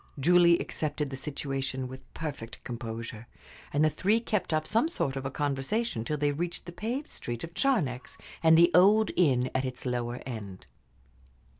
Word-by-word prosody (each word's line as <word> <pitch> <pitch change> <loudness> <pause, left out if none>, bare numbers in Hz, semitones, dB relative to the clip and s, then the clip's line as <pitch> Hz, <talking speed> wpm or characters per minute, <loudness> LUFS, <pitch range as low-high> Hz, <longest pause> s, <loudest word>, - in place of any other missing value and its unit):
Julie 170 +3 +6
accepted 150 -4 -3
the - - -3
situation 135 -2 -3
with 130 +1 -11
perfect 140 -8 -6
composure, 115 -1 -6 0.4
and 145 +2 +3
the - - +5
three 205 +9 +2
kept 215 -6 -1
up 155 0 +1
some 230 +8 +2
sort 140 - -2
of 135 0 -3
a - - -3
conversation 145 - -1
till 150 +6 -2
they 145 0 +1
reached 170 +4 -3
the 175 - -7
paved 235 - -3
street 120 -1 -6
of 165 0 -7
Charnex 160 - 0 0.2
and 160 0 +6
the 170 +1 +6
old 205 +4 +6
inn 130 -7 +3
at 130 - +1
its 130 0 -5
lower 120 -1 -2
end. 100 - -7
145 Hz, 170 wpm, -29 LUFS, 130-175 Hz, 0.4 s, Julie